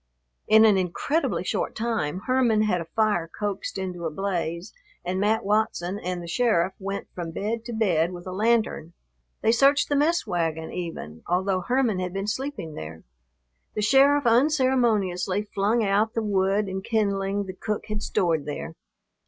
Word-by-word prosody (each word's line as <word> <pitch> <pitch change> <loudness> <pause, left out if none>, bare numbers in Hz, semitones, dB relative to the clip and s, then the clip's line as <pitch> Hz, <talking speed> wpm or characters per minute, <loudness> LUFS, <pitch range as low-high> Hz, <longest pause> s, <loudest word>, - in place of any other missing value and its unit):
In 220 +1 +7
an 205 -3 +5
incredibly 230 - -1
short - - -2
time 220 -8 -2
Herman 240 -3 +2
had 185 -5 +1
a - - -6
fire 210 -3 0
coaxed 205 -2 -3
into 180 -3 -4
a - - -2
blaze 175 +1 -3 0.3
and 185 +1 -1
Mat 215 +2 +1
Watson 205 -3 0
and 180 -2 -4
the - - -8
sheriff 190 -2 +1
went 195 0 -4
from 175 -2 -5
bed 215 +7 -3
to 240 - -5
bed 180 -7 +1
with 175 -1 -9
a 185 - -5
lantern. 215 -5 0 0.5
They 225 - +4
searched 275 +5 +4
the 290 - +1
mess 320 +5 +2
wagon, 165 -5 -2
even, 165 - -6
although 185 +2 +1
Herman 245 -2 +1
had 180 -1 -3
been 195 0 -3
sleeping 220 - -4
there. 80 - -8 0.7
The 210 - -1
sheriff 275 +4 +5
unceremoniously 230 - +2
flung 215 +4 +2
out 210 +2 +1
the 225 - 0
wood 200 0 +1
and 190 0 -4
kindling 200 -2 0
the 185 - -6
cook 210 +3 -4
had 210 -1 -4
stored 160 -8 0
there. 150 +2 -5
200 Hz, 165 wpm, -25 LUFS, 180-225 Hz, 0.7 s, In